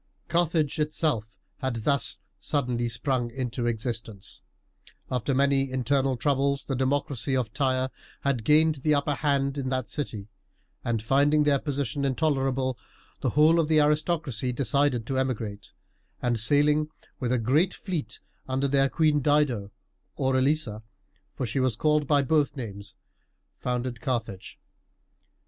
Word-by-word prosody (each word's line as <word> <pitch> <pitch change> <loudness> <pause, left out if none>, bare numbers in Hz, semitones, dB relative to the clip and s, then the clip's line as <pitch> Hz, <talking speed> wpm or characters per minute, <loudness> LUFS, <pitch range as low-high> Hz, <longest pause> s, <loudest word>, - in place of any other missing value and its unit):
Carthage 165 -3 +1
itself 150 -7 -1 0.2
had 130 -4 -2
thus 140 -1 +1 0.2
suddenly 125 -5 -1
sprung 120 +1 -1
into 125 -1 -3
existence. 115 -3 -4 0.7
After 130 +2 0
many 135 0 +2
internal 130 +1 +1
troubles 140 0 +1
the 135 - -2
democracy 135 0 0
of 115 -5 -2
Tyre 130 -1 0 0.3
had 135 -5 0
gained 155 +3 +4
the 150 +3 +2
upper 145 +1 +1
hand 140 -1 0
in 130 -1 -2
that 130 -2 -2
city; 110 -9 -4 0.6
and 115 -2 -1
finding 145 +5 +3
their 145 -2 +3
position 140 -2 -2
intolerable, 135 -3 0 0.4
the - - 0
whole 155 +3 +5
of 160 - +2
the 155 -1 +4
aristocracy 150 -4 +1
decided 130 -1 +1
to 130 +2 -1
emigrate, 110 -6 -3 0.5
and, 120 -2 0
sailing 150 +5 +3 0.3
with 125 -3 -1
a 125 - +3
great 140 - +2
fleet 175 -7 -4 0.3
under 135 +1 0
their 135 0 +3
queen 155 0 +2
Dido 135 -8 +2 0.5
or 135 -1 0
Elisa 130 -5 +1 0.5
for 130 - -4
she 120 +4 -2
was 130 -4 +1
called 150 +3 +2
by 145 -1 +4
both 150 +1 +1
names 100 -5 -7 0.6
founded 125 -1 -3
Carthage. 115 -8 -3
135 Hz, 135 wpm, -27 LUFS, 120-145 Hz, 0.7 s, whole